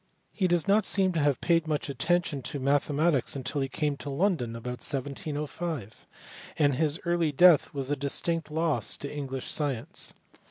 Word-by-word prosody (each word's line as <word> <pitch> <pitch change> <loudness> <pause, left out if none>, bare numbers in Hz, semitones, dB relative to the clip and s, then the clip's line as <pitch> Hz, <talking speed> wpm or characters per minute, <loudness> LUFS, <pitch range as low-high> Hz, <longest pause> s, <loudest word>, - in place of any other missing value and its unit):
He 190 - +1
does 175 -3 +2
not 205 0 +4
seem 190 -2 +3
to 165 - 0
have 145 -3 +2
paid 165 -2 +2
much 150 -2 -1
attention 150 +2 0
to 145 +2 -4
mathematics 145 +1 +1
until 140 +2 -2
he 135 - -1
came 145 0 -1
to 145 - -6
London 140 - 0
about 125 +1 -6
1705, 145 - -4 0.5
and 145 -2 +3
his 155 +4 0
early 170 -2 +1
death 170 +1 +6
was 140 -1 -3
a - - +2
distinct 155 +3 -1
loss 160 0 0
to 140 - -6
English 135 -3 -4
science. 140 -7 -3
145 Hz, 165 wpm, -28 LUFS, 135-165 Hz, 0.5 s, death